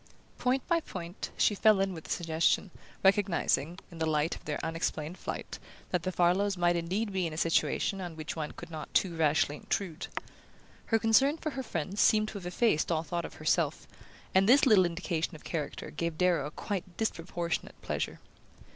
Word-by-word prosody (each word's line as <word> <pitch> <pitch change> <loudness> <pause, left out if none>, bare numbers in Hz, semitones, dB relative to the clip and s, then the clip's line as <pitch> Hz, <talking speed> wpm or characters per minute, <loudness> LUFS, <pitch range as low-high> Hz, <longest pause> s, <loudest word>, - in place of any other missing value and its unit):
Point 255 +1 +1
by 340 -1 +3
point, 180 - -6
she - - +4
fell 215 0 +5
in 195 -1 +1
with 160 -2 -9
the - - -11
suggestion, 165 +3 +1 0.3
recognizing, 185 -5 +2
in 165 - -10
the 160 - +1
light 155 +2 +1
of - - -14
their 150 - -2
unexplained 165 0 -2
flight, - - -5 0.3
that 180 - +1
the 185 - -2
Farlows 185 +3 +2
might 175 0 +3
indeed 190 +5 -1
be 185 -2 +1
in 160 - -6
a - - -6
situation 170 +4 +1
on 175 -3 -6
which 155 -1 -5
one 155 -2 -3
could 170 -1 -10
not 155 -2 -7
too 180 -3 +2
rashly 150 -2 +2
intrude. 185 -4 -3 0.8
Her 225 - +4
concern 250 +7 +4
for 310 -1 -3
her 270 - -4
friends 190 - -2
seemed 215 0 +4
to 205 - -6
have 175 - -7
effaced 180 -3 +2
all 160 -1 +1
thought 170 +2 -3
of - - -9
herself, - - 0 0.5
and 195 +3 +4
this 275 +4 +7
little 210 -7 +6
indication 170 -1 -2
of 155 - -12
character 150 -4 -4
gave 170 +1 -3
Darrow 175 -5 +2
a - - -5
quite 185 +2 -5
disproportionate 170 -5 -2
pleasure. - - -3
175 Hz, 190 wpm, -30 LUFS, 165-200 Hz, 0.8 s, this